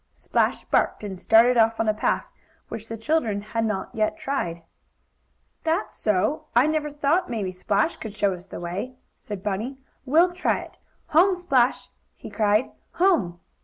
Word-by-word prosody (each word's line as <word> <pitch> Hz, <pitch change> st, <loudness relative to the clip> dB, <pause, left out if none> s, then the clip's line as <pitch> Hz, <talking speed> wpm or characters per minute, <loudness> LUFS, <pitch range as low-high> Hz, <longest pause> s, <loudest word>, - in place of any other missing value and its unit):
Splash -, -, 0 dB
barked, -, -, +1 dB
and 205 Hz, -2 st, -4 dB
started 235 Hz, +4 st, +5 dB
off 225 Hz, 0 st, +3 dB
on 225 Hz, -, +1 dB
a 215 Hz, -, +3 dB
path 210 Hz, -, 0 dB, 0.4 s
which 225 Hz, 0 st, -7 dB
the 225 Hz, -, -6 dB
children 225 Hz, -4 st, 0 dB
had 225 Hz, +2 st, -2 dB
not 215 Hz, -3 st, -2 dB
yet 215 Hz, +7 st, 0 dB
tried. 270 Hz, -, -3 dB, 1.0 s
"That's 330 Hz, +5 st, -1 dB
so. 210 Hz, +8 st, 0 dB
I 240 Hz, +3 st, +6 dB
never 310 Hz, -1 st, 0 dB
thought 295 Hz, +4 st, 0 dB
maybe 210 Hz, -6 st, -2 dB
Splash 200 Hz, -, 0 dB
could 215 Hz, -2 st, -8 dB
show 200 Hz, -2 st, +1 dB
us 180 Hz, +1 st, -10 dB
the -, -, -8 dB
way," 185 Hz, +9 st, -5 dB, 0.2 s
said 205 Hz, -3 st, -8 dB
Bunny. 215 Hz, +7 st, -3 dB, 0.3 s
"We'll 330 Hz, +7 st, +4 dB
try 360 Hz, -, 0 dB
it! -, -, -13 dB, 0.3 s
Home, 365 Hz, +5 st, +5 dB
Splash!" 270 Hz, -9 st, +1 dB, 0.3 s
he -, -, -10 dB
cried. 215 Hz, +2 st, +2 dB, 0.2 s
"Home!" 285 Hz, -, +2 dB
225 Hz, 165 wpm, -24 LUFS, 205-300 Hz, 1.0 s, I